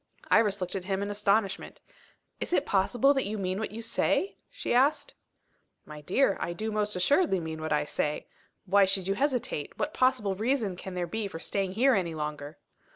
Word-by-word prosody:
Iris 210 -3 +4
looked 180 - -2
at 185 -2 -4
him 195 0 -1
in 205 - -3
astonishment. 205 -1 0 0.6
"Is - - -4
it 290 - +2
possible 240 +8 +3
that 270 -6 -1
you 215 +1 -3
mean 185 0 -2
what 220 - -2
you 225 +2 -7
say?" 385 - 0
she - - -3
asked. 265 +5 +2 0.7
"My 150 -1 -10
dear, 195 - +2
I 170 - -2
do 220 +5 -3
most 210 -1 0
assuredly 190 - +3
mean 160 -1 -5
what 160 - -4
I 150 0 +2
say. 150 0 -2 0.4
Why 200 +1 +5
should 190 -1 -2
you 195 - +2
hesitate? 250 - -2
What 300 - -2
possible 215 -6 +2
reason 220 -1 0
can 185 +1 -8
there 180 -1 -1
be 210 +4 -3
for 175 - -7
staying 190 +2 -2
here 255 +6 +4
any 175 -6 0
longer?" 150 -1 -5
200 Hz, 195 wpm, -29 LUFS, 180-225 Hz, 0.7 s, Why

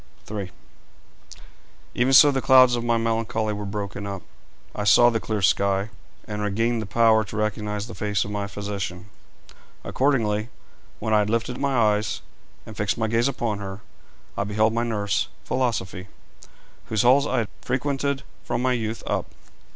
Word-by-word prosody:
III. 100 -3 -4 1.4
Even 125 +2 +1
so 145 +2 +8
the 135 -1 -1
clouds 130 -2 +6
of 120 - -3
my 120 -1 +2
melancholy 115 -1 -1
were 105 0 -5
broken 100 0 -5
up. 100 -3 -6 0.5
I 105 - -3
saw 120 +4 +6
the 115 - 0
clear 105 -2 -3
sky, 100 +2 +2 0.4
and 105 -1 -4
regained 115 +3 0
the 110 - -6
power 110 +1 +4
to 105 - -7
recognise 105 -1 -2
the 115 - -9
face 105 -1 -1
of 105 - -6
my 100 -1 -3
physician. 100 -2 -5 0.7
Accordingly, 115 -5 0 0.5
when 110 0 -2
I 105 - +5
had 105 0 0
lifted 115 +2 -1
my 140 -2 0
eyes 105 -2 +1 0.4
and 110 - -10
fixed 100 -1 -1
my 110 -1 0
gaze 115 +3 +2
upon 120 -6 -2
her, 95 0 -7 0.5
I - - -1
beheld 110 +2 +1
my 115 +1 0
nurse, 105 -4 -1 0.2
Philosophy, 100 -7 -2 0.8
whose 110 -2 0
halls 135 +4 +5
I 130 - -1
had 115 -3 0
frequented 140 +2 -1 0.2
from 120 +1 -2
my 130 0 +2
youth 115 -2 -3
up. - - -1
110 Hz, 165 wpm, -24 LUFS, 105-120 Hz, 1.4 s, so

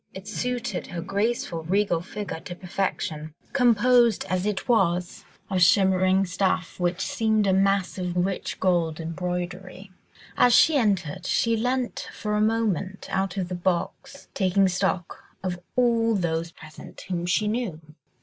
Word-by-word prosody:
It 190 +1 -9
suited 245 -6 -3
her 175 - -6
graceful, 200 -2 -1
regal 180 0 +1
figure 195 -1 -6
to 175 +2 -8
perfection, 160 -4 -3 0.2
composed 240 -2 +4
as 185 +2 0
it 205 -2 -2
was 180 -6 +1 0.2
of 185 -2 -1
shimmering 190 +1 +4
stuff 185 -1 -1
which 175 +1 0
seemed 220 -2 +1
a 190 - +3
mass 195 0 +1
of 180 -1 -3
rich 185 +1 -2
gold 170 -4 +1
embroidery. 180 +3 -5 0.4
As 245 -1 +5
she 315 - +6
entered, 190 - 0
she 230 -1 +2
leant 250 +2 -2
for 210 -1 -4
a 210 - +1
moment 210 -4 -1
out 190 0 -1
of 185 -2 -1
the 180 - -5
box, 180 +1 -3
taking 195 0 +2
stock 185 -1 -2 0.2
of 180 -2 -3 0.2
all 230 -2 +3
those 170 -3 -1
present 155 -2 -12
whom 175 -2 -3
she 210 +4 +1
knew. 215 -7 -2
190 Hz, 145 wpm, -25 LUFS, 175-210 Hz, 0.4 s, she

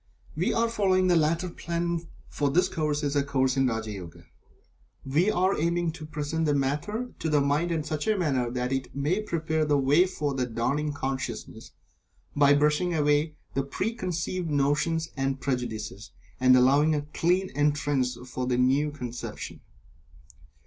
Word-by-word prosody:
We - - +1
are 230 0 +2
following 195 -5 +2
the 175 - +5
latter 165 +3 +2
plan, 170 -1 -3 0.2
for 145 -1 -1
this 175 +6 +3
course 150 -2 -1
is 145 0 -1
a 145 - +4
Course 130 -2 +1
in 135 -1 +3
Raja 110 -2 -2
Yoga. 90 -5 -9 0.8
We 155 +9 +2
are 190 -1 +2
aiming 170 +1 0
to 160 -2 -9
present 155 +1 -2
the 145 - +2
matter 150 - -2
to 160 - -2
the 150 -1 +3
mind 145 +5 +1
in 160 -2 0
such 155 +4 -3
a 215 -1 +2
manner 135 -9 0
that 125 +1 -2
it 135 0 -4
may 150 +9 0
prepare 160 -5 -1
the 150 -1 +2
way 145 +7 +4
for 150 -6 -2
the 130 -2 -1
dawning 130 +6 -1
consciousness, 135 -2 -5 0.6
by 145 0 +5
brushing 150 +4 +2
away 150 +1 +2 0.2
the 135 - +1
preconceived 180 - -3
notions 150 +3 +1
and 135 0 -1
prejudices, 115 -6 -4 0.3
and 130 0 +6
allowing 140 +5 +4
a 145 - -1
clean 185 +3 +1
entrance 145 -4 0
for 125 0 -4
the 125 -1 +1
new 135 +4 +3
conception. 125 -5 -7
150 Hz, 165 wpm, -27 LUFS, 135-170 Hz, 0.8 s, and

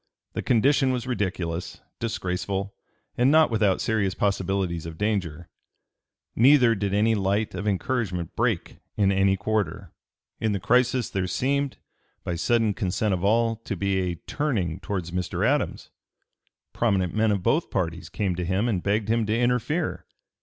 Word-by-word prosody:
The - - -2
condition 135 +3 +3
was 125 -2 -2
ridiculous, 90 -7 -3 0.2
disgraceful, 100 -2 -3 0.5
and 125 +2 +5
not 155 -2 +5
without 105 -4 +2
serious 100 -5 0
possibilities 95 -4 -1
of 80 -1 -8
danger. 95 -6 -2 0.9
Neither 125 -1 +6
did 100 -2 -2
any 105 +3 +3
light 100 +1 0
of 105 - -4
encouragement 100 -5 -1
break 115 -7 -1 0.2
in 100 -2 +3
any 95 0 +3
quarter. 105 -3 -2 0.5
In 110 -2 0
the 100 - -1
crisis 125 +2 +2
there 95 -1 -1
seemed, 140 +6 -1 0.5
by 85 - -2
sudden 110 +5 +1
consent 100 0 -1
of 90 0 -2
all, 115 +2 +2
to 115 -2 -5
be 100 0 0
a 90 -2 -1
turning 100 - -1
towards 90 -2 -4
Mr. 90 0 -1
Adams. - - -1 0.8
Prominent 95 -7 +1
men 110 +1 +2
of 100 -3 -1
both 160 - +1
parties 85 -2 -2
came 95 +1 -1
to 90 - -2
him 95 +6 0
and 100 -7 0
begged 105 +2 0
him 115 -1 +1
to 110 +1 +1
interfere. 125 +7 0
100 Hz, 155 wpm, -25 LUFS, 95-115 Hz, 0.9 s, Neither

